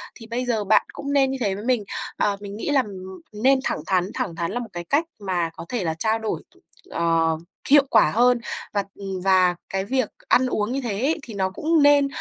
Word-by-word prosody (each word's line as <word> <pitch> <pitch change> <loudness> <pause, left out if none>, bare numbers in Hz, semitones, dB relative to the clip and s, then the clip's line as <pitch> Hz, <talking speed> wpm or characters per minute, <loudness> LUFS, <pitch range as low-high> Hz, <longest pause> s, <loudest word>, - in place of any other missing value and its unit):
thì 225 - -12
bây 240 +2 -2
giờ 230 -4 0
bạn 210 +1 +4
cũng 280 0 -4
nên 270 -2 +3
như 270 - -2
thế 200 -4 +1
với 205 +3 -7
mình, 245 -4 +2 0.3
ờ, 200 -1 +1
mình 200 -1 -7
nghĩ 225 - -3
là, 285 -2 +4
ừm, 190 -4 -9 0.2
nên 265 +1 +5
thẳng - - -1
thắn, 185 0 +1
thẳng 170 - -3
thắng 170 0 -2
là 245 - -2
một 235 -2 -6
cái 175 0 -5
cách 290 - +2
mà 180 -4 -1
có - - -9
thể 240 -6 -2
là 160 -2 0
trao 220 +3 +1
đổi, 220 -1 -3 0.5
ờ, 165 -1 +1 0.3
hiệu 285 0 +7
quả 220 - +5
hơn 245 +2 +4 0.3
và, 200 -1 +1
ừm, 195 -2 -5
và 185 -2 +4
cái 190 0 -2
việc 255 0 0 0.2
ăn 255 +1 +4
uống 215 -2 -1
như 275 +2 -1
thế 215 -3 -2
ấy 310 +5 +1
thì 230 - -9
nó 190 -2 0
cũng 315 - +1
nên 285 -1 +6
215 Hz, 235 wpm, -23 LUFS, 190-255 Hz, 0.5 s, hiệu